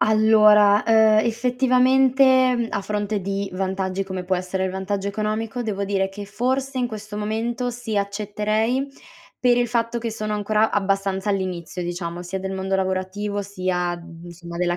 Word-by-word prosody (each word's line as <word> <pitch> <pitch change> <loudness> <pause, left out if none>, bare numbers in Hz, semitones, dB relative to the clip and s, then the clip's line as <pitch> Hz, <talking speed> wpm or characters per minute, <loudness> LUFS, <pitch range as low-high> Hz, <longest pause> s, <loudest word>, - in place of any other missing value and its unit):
Allora, 215 -1 +5
uhm, 225 - +4 0.3
effettivamente, 255 +2 +3
mhmm, 235 -1 -1
a 200 - -1
fronte 210 0 -2
di 195 +1 -3
vantaggi, 190 0 -2
come 190 -1 -5
può 185 0 0
essere 185 +1 -2
il 185 - -1
vantaggio 195 +1 -3
economico, 215 +4 -2
devo 205 -3 -3
dire 195 -1 0
che 205 +1 -8
forse 260 +5 -2
in 245 - +1
questo 215 -2 -8
momento, 225 +4 -2
sì, 235 -3 -5
accetterei 215 +5 -1 0.5
per 245 -1 +4
il 245 0 +2
fatto 235 0 -1
che 230 -1 -4
sono 215 -1 -3
ancora 210 +1 +1
abbastanza 195 0 0
all'inizio, 180 -2 -3
diciamo, 175 0 -4
sia 185 +2 -4
del 190 0 -4
mondo 190 0 -1
lavorativo, 190 +2 -2
sia 185 -3 -2
d - - -11
mhmm, 170 0 -13
insomma, 170 0 -9
della 175 0 0
205 Hz, 165 wpm, -22 LUFS, 190-225 Hz, 0.5 s, Allora